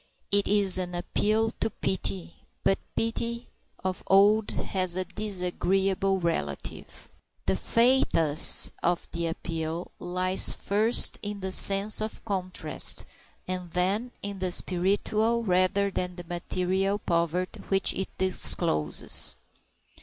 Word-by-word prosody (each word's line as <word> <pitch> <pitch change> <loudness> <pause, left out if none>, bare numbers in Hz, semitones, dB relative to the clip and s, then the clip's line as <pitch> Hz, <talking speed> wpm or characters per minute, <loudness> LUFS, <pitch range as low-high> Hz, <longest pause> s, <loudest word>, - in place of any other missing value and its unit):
It 200 0 +2
is 200 -2 +4
an 180 -1 -5
appeal 215 +5 -1
to - - 0
pity, 95 - -4 0.3
but 195 - +2 0.2
pity 235 +1 -3 0.3
of 185 -1 -3
old 205 +2 +4
has 185 -2 -2
a 185 0 -2
disagreeable 195 0 -1
relative. 75 - -5 0.4
The 95 - +1
pathos 165 - +3
of 175 0 -1
the 170 0 -3
appeal 165 0 -5
lies, 185 +1 +2
first, 215 +4 +2
in 205 -1 -6
the 190 0 -4
sense 200 +3 +5
of 215 0 -6
contrast, 185 -4 +1 0.4
and 180 -1 -4
then 195 +8 -1
in 200 -1 -5
the 185 0 -2
spiritual 210 +6 0
rather 190 +1 +1
than 180 -1 -4
the 175 - -9
material 185 +3 -2
poverty 170 -1 -2
which 195 0 +2
it 190 - -4
discloses. 75 - +2
190 Hz, 115 wpm, -26 LUFS, 175-205 Hz, 0.4 s, sense